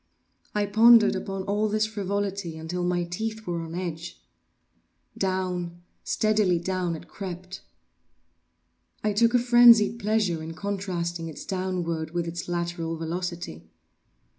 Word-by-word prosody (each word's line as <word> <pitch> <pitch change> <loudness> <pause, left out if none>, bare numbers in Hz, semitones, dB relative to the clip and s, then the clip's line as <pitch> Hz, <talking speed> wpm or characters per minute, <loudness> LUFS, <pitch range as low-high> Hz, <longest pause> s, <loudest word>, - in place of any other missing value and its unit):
I 210 0 +2
pondered 220 +1 +6
upon 195 0 -4
all 205 +2 0
this 215 +1 +1
frivolity 200 -4 -3
until 170 +3 -4
my 175 0 +1
teeth 220 +6 -4
were 170 -1 -2
on 165 0 -7
edge. 175 -1 -5 1.0
Down—steadily 185 +2 -1
down 180 0 -2
it 160 - -10
crept. 185 -1 -7 1.4
I 210 -1 +1
took 230 +3 +3
a - - +8
frenzied 240 -2 +6
pleasure 210 -6 0
in 160 +1 -7
contrasting 175 -3 -3
its 160 - -8
downward 175 -4 -3
with 170 -1 0
its 170 +1 -5
lateral 170 -1 -2
velocity. 165 - -5
185 Hz, 120 wpm, -26 LUFS, 170-205 Hz, 1.4 s, a